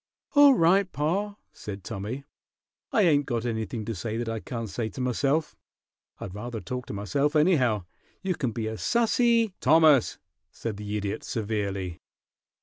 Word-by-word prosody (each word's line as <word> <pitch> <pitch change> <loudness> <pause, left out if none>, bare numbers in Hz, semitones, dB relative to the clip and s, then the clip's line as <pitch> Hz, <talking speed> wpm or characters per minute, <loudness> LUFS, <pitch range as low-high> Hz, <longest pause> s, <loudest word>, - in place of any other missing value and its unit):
"All 285 -2 +8
right, 185 +1 +3
pa," 195 +8 -1 0.2
said 100 -2 -8
Tommy. 110 +7 -5 0.7
"I 210 - +3
ain't 145 -5 +3
got 120 -2 -2
anything 110 -1 -3
to 115 - -3
say 110 +3 -4
that 120 0 -3
I 115 0 -2
can't 115 +4 -5
say 110 +2 -3
to 130 - -10
myself. 135 +5 0 0.6
I'd 95 - -7
rather 115 +3 -5
talk 125 +2 -5
to - - -6
myself, 140 +9 0
anyhow. 130 - +3 0.4
You 190 -1 0
can 130 -8 -2
be 110 -1 -3
as 110 0 -5
sassy 235 -2 +2
" - - -51
"Thomas!" 155 -5 +5 0.3
said 110 -3 -5
the 105 0 -3
Idiot, 100 -1 -3
severely. 100 -5 -3
120 Hz, 160 wpm, -27 LUFS, 105-160 Hz, 0.7 s, All